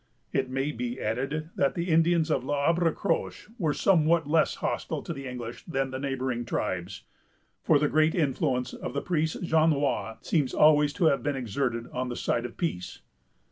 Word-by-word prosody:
It 130 -1 0
may 135 +3 -1
be 125 0 -4
added, 135 +9 -2
that 140 - +2
the 175 +1 -2
Indians 165 0 +3
of 135 - +1
L'Arbre 160 +5 +2
Croche 200 - -2
were 160 -6 +1
somewhat 170 -3 +3
less 155 +1 +2
hostile - - -3
to 170 - -4
the 140 -3 -7
English 120 -2 -7
than 135 -5 -2
the 130 - -4
neighboring 130 -3 -2
tribes; 95 -4 -3 0.6
for 155 - +4
the 150 +1 +2
great 155 +2 +2
influence 130 -5 0
of - - -6
the 140 - 0
priest 160 -1 -1
Jonois 155 -8 +1
seems 145 -6 +1
always 150 -1 +5
to 180 -1 +1
have 140 -3 +3
been 145 -1 -1
exerted 120 -1 -2
on 125 0 -2
the 120 - -4
side 120 0 -1
of 120 - -8
peace. 160 - -3
140 Hz, 180 wpm, -27 LUFS, 125-160 Hz, 0.6 s, always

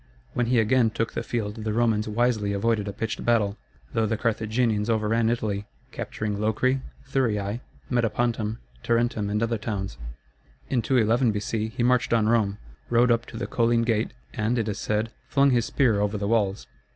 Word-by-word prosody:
When 120 -1 0
he 125 +1 +3
again 115 +1 +3
took 115 +1 -2
the - - -2
field 110 -2 -3
the 110 -1 -1
Romans 110 -2 +2
wisely 110 -2 +1
avoided 105 +1 0
a - - -2
pitched 110 +2 -4
battle, 110 -4 +2 0.4
though 110 -1 +2
the 110 +1 -1
Carthaginians 110 -1 0
overran 110 +1 +2
Italy, 105 -4 -2 0.2
capturing 105 -1 -4
Locri, 130 +5 +1 0.3
Thurii, 110 -5 0 0.3
Metapontum, 115 -2 0 0.2
Tarentum, 115 - +1
and 105 +2 0
other 115 -1 0
towns. 100 - -4 0.7
In 125 -3 +2
211 120 0 +3
B.C. 105 +1 -2
he 120 - +1
marched 125 -1 +2
on 110 -2 +3
Rome, 110 -3 +2 0.3
rode 120 +1 +4
up 115 0 +1
to 115 - -8
the - - -3
Colline 115 0 +2
gate, 115 -1 0 0.2
and, 115 +1 0
it 110 -2 0
is 105 - -3
said, 110 +1 -1 0.2
flung 140 -1 +4
his 120 -2 +2
spear 115 -6 +2
over 105 +1 0
the 100 0 -2
walls. 105 -3 +1
115 Hz, 175 wpm, -26 LUFS, 105-120 Hz, 0.7 s, rode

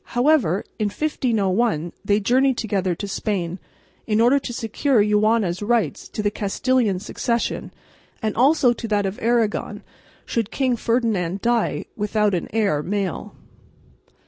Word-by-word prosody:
However 245 - +3 0.2
in 215 - +1
1501, 210 - 0
they 205 +1 +2
journeyed 255 +4 +2
together 195 -5 -1
to 200 - -5
Spain, 190 -3 -2 0.5
in 215 -1 +1
order 245 +5 +5
to 260 - -6
secure 235 +3 0
Juana's 210 -3 +2
rights 210 - 0
to 210 - -4
the 205 - +1
Castilian 210 +1 0
succession 235 +3 -2 0.5
and 220 -3 -2
also 260 0 +4
to 235 -1 -6
that 205 -2 +1
of 195 +1 -4
Aragon 230 -2 0 0.4
should 225 -3 -1
King 255 -1 0
Ferdinand 220 -7 0
die 235 -1 0
without 210 -1 +1
an 175 - -1
heir 200 -9 +1
male. 195 -1 -3
215 Hz, 135 wpm, -22 LUFS, 195-240 Hz, 0.5 s, order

